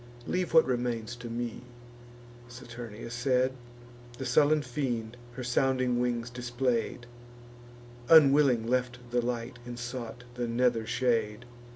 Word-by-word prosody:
Leave 180 -1 -1
what 160 0 +6
remains 120 -2 -2
to 120 0 -8
me." 120 0 -4 0.9
Saturnia 120 -2 -9
said: 125 +1 +1 0.6
The 130 - -5
sullen 145 +4 +3
fiend 120 -4 -3 0.2
her 125 - -6
sounding 125 0 +1
wings 120 -1 -1
display'd, 120 0 -2 1.0
Unwilling 140 -6 +6
left 125 0 0
the 120 0 +2
light, 120 0 -3
and 120 0 -7
sought 120 0 -6
the 120 -1 -3
nether 115 -1 +1
shade. 115 -2 0
120 Hz, 115 wpm, -29 LUFS, 120-130 Hz, 1.0 s, what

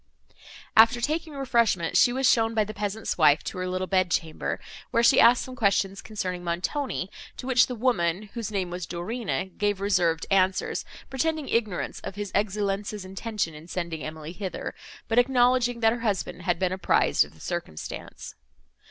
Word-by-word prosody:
After 230 +2 +7
taking 310 +5 -2
refreshment, 235 -11 +1
she 245 - +6
was 260 +1 +1
shown 225 -1 +3
by 215 - +3
the 215 +1 -7
peasant's 210 -1 -3
wife 150 -2 +5
to - - -5
her 185 - -2
little 185 +1 -2
bed 185 -1 +2
chamber, 160 -1 -2 0.3
where 235 - +2
she - - +6
asked 235 +1 +6
some 255 - -8
questions 195 -3 +1
concerning 185 -4 -4
Montoni, 185 - -2 0.3
to - - -7
which 255 -1 +4
the 250 - -4
woman, 210 -7 +1
whose 230 -2 -4
name 190 -4 -2
was 175 -1 -5
Dorina, 190 +3 -3
gave 205 -2 +1
reserved 175 -5 +1
answers, 190 -1 +1 0.3
pretending 310 +2 -1
ignorance 215 -6 -1
of - - -7
his 205 -1 -5
Excellenza's 205 0 -1
intention 195 -2 -3
in 155 +2 -12
sending 170 -3 -4
Emily 155 0 -6
hither, 190 +1 -5 0.3
but 230 +1 +3
acknowledging 245 -1 +3
that 225 0 +4
her 240 - -4
husband 205 -5 -2
had 175 -1 0
been 185 +1 0
apprized 185 0 +3
of - - -14
the - - -19
circumstance. 165 - -6
205 Hz, 170 wpm, -26 LUFS, 180-235 Hz, 0.3 s, After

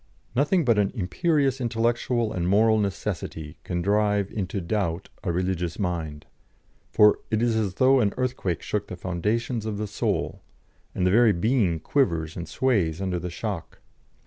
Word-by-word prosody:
Nothing 150 +6 +2
but 115 -4 +3
an 100 -1 +2
imperious 135 - +1
intellectual 120 0 0
and 90 -1 -1
moral 110 +3 +4
necessity 90 -6 -4
can 85 -1 -3
drive 105 0 +1
into 100 -1 -3
doubt 90 -1 -2
a 90 - 0
religious 90 -1 -1
mind, 85 -6 -3 0.6
for 105 0 +5
it 110 - +1
is 120 -2 +2
as 105 -4 -1
though 130 +3 +5
an 105 -4 +2
earthquake 125 -9 -2
shook 105 -1 -2
the - - -6
foundations 105 +7 -2
of 110 -2 -3
the 105 - -2
soul, 105 - -2 0.5
and 90 - 0
the 90 - +3
very 115 0 +5
being 95 -3 +1
quivers 85 - 0
and 85 - -6
sways 95 -11 +1
under 95 -2 -1
the 90 - -4
shock. 85 -1 -5
100 Hz, 160 wpm, -25 LUFS, 90-115 Hz, 0.6 s, for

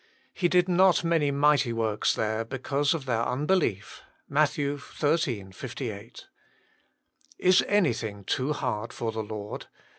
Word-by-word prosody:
"He 180 - +1
did 180 0 +3
not 185 0 +4
many 165 -3 +2
mighty 140 -2 +3
works 110 -2 0
there 110 +1 -1
because 140 +5 -1
of 150 -5 -5
their 115 -3 0
un 125 +5 -1
belief. 150 - 0 0.3
"MATT, 145 0 +1 0.2
xiii. 135 - 0
58. 115 0 -7 1.1
"Is 185 +1 +4
anything 115 - 0
too 130 +8 -1
hard 120 -6 -3
for 115 -1 -3
the 110 0 -3
Lord? 105 -1 -7
135 Hz, 130 wpm, -27 LUFS, 110-155 Hz, 1.1 s, not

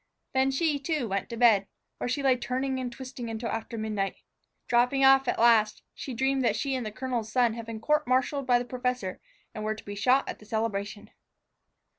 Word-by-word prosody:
Then 265 0 +3
she, 290 +2 +1
too, 285 -3 -1
went 195 -1 -2
to 235 - -6
bed, 220 -5 +5 0.3
where - - -2
she 255 +3 -1
lay 265 -2 +4
turning 260 +1 -2
and 250 -1 -3
twisting 250 -1 -7
until 225 +1 -4
after 225 +1 -4
midnight. 210 -3 -2 0.5
Dropping 250 +3 +3
off, 270 0 +6
at - - 0
last, 225 -2 +4
she 260 - -6
dreamed 265 +2 +1
that 235 - +2
she 275 -1 -1
and 255 -2 -1
the 215 - -5
colonel's 240 -2 -3
son 240 -1 +3
had 230 0 -7
been 225 -1 -5
court 300 +5 +1
martialed 260 +2 +1
by 245 -1 +5
the 245 - -3
professor 250 -6 -3 0.3
and 215 - -6
were 215 0 -1
to - - -13
be 205 - -6
shot 250 +7 +2
at - - -5
the 210 - -15
celebration. 210 -1 -3
245 Hz, 210 wpm, -28 LUFS, 220-265 Hz, 0.5 s, off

